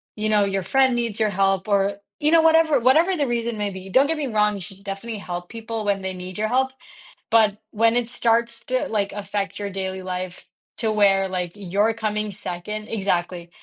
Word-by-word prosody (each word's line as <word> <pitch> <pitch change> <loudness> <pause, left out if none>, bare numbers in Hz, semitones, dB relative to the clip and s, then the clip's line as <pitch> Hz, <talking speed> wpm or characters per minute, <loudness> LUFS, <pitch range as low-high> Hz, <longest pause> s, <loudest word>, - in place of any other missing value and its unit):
you 215 0 -1
know, 210 -1 +4
your 195 -1 -1
friend 260 +6 +3
needs 235 -3 -2
your 215 -1 +2
help 195 0 +1
or 200 -1 +2 0.3
you 300 - +3
know, 330 0 +6
whatever 320 -3 +4
whatever 320 +10 +4
the 285 -3 +1
reason 235 -1 -2
may 205 -1 -1
be, 190 0 -8
don't 265 +8 +4
get 325 +1 -1
me 295 -2 -2
wrong, 210 -3 +2
you 195 - -7
should 195 +2 -9
definitely 205 +3 -5
help 175 -2 -6
people 225 -1 -5
when 200 -1 +1
they 190 0 -3
need 185 +1 -8
your 215 +1 0
help, 260 +3 +1 0.6
but 215 -3 +4
when 230 +2 +3
it 245 -1 +1
starts 235 -1 0
to, 255 0 0
like, 205 -2 -1
affect 200 -1 -3
your 200 -1 -4
daily 190 -1 -4
life 185 0 -5 0.3
to 220 - 0
where, 195 -2 +3
like, 180 -2 -3
you're 205 +2 +1
coming 215 -1 -2
2nd 210 +4 -4
exactly, 175 -5 -2
210 Hz, 205 wpm, -23 LUFS, 195-235 Hz, 0.6 s, know